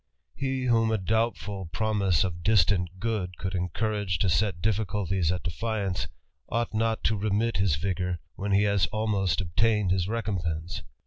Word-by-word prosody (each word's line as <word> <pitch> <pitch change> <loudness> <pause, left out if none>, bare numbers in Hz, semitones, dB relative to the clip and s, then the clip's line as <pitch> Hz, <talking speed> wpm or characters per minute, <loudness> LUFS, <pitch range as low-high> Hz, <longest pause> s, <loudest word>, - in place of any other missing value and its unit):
He, 135 -1 -2
whom 115 -2 +3
a 110 - +2
doubtful 105 -2 -1
promise 100 -3 +1
of 85 -2 -3
istant 95 -2 +3
good 95 -4 -2
could 95 0 -3
encourage 95 +1 -1
to 95 - +2
set 95 0 +1
difficulties 95 -4 0
at 90 -4 -2
defiance, 100 0 -2 0.4
Ught 115 0 0
not 110 0 0
to 110 - +2
remit 105 +1 0
his 95 -5 +3
vigour, 90 +1 -1 0.2
when 100 +1 -3
he 100 +1 +4
has 100 -2 +3
almost 100 -5 0
obtained 100 +2 +2
is 95 -1 +1
recompense. 90 -7 -2
100 Hz, 150 wpm, -27 LUFS, 90-110 Hz, 0.4 s, he